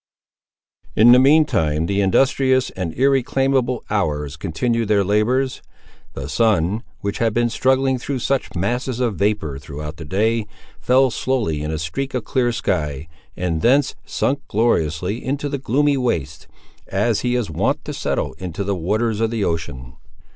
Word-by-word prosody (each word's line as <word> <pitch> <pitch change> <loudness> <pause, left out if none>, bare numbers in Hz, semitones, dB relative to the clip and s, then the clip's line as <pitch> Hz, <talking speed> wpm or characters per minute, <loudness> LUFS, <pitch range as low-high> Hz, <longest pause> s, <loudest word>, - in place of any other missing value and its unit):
In 115 +3 +7
the 125 - +8
mean 150 +4 +6
time 80 - 0
the 100 +3 0
industrious 130 +6 +2
and 90 -3 -4
irreclaimable 135 -1 +1
hours 75 -8 -1
continued 115 +9 -1
their 100 -1 +3
labours. 120 +7 +1 0.5
The - - -6
sun, 105 -2 +1 0.2
which 100 +1 -3
had 115 -2 +1
been 120 0 +2
struggling 130 +1 +2
through 135 +2 -3
such 135 +2 -1
masses 120 +7 -1
of 120 -5 0
vapour 100 -9 -1
throughout 75 +3 -7
the 80 - -8
day, 110 +6 0 0.3
fell 130 +1 +3
slowly 110 - -1
in 75 - -3
a 80 - -2
streak 130 - -4
of 125 - -1
clear 120 0 +1
sky, 75 - -2 0.3
and 85 -3 -1
thence 135 +3 +3
sunk 140 +1 -1
gloriously 95 -2 0
into 145 +2 -2
the 140 -1 -3
gloomy 140 +3 +2
wastes, 120 - -2 0.4
as 105 +2 +1
he 125 0 0
is 120 -4 -1
wont - - -1
to - - -5
settle - - -2
into 90 +1 -4
the 100 +1 -1
waters 105 +5 -1
of 115 - +2
the 115 -2 -2
ocean. 70 -8 -4
110 Hz, 160 wpm, -20 LUFS, 85-130 Hz, 0.5 s, the